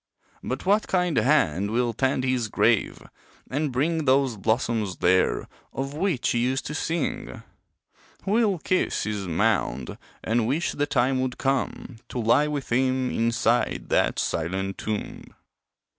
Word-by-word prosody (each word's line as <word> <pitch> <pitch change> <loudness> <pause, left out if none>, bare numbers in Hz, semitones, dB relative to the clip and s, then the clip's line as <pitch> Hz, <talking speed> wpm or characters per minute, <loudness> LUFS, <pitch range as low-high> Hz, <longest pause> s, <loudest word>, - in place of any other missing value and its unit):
But 130 +6 -4
what 205 +3 +3
kind 180 -4 +1
hand 100 - +2
will 120 +1 0
tend 130 +2 0
his 130 -3 0
grave, - - +1 0.5
and 145 +2 -1
bring 155 +5 0
Those 130 -2 +3
blossoms 110 -2 -1
there, 95 +1 +2 0.3
of 135 +1 -4
which 160 -5 0
he 120 - +1
used 130 +3 0
to 150 - -4
sing? 160 0 -3 0.8
Who'll 210 -1 +2
kiss 185 +3 0
his 105 -2 -3
mound, 65 -6 0 0.2
and 115 0 +1
wish 150 +7 0
the 145 0 -1
time 130 -1 +1
would 130 -1 -2
come 135 -2 -2
To - - -6
lie 120 +6 +3
with 145 -4 -4
him 130 +1 +1
inside 115 +1 0
that - - +2
silent 95 +4 -2
tomb? 105 -1 -5
130 Hz, 140 wpm, -25 LUFS, 110-145 Hz, 0.8 s, what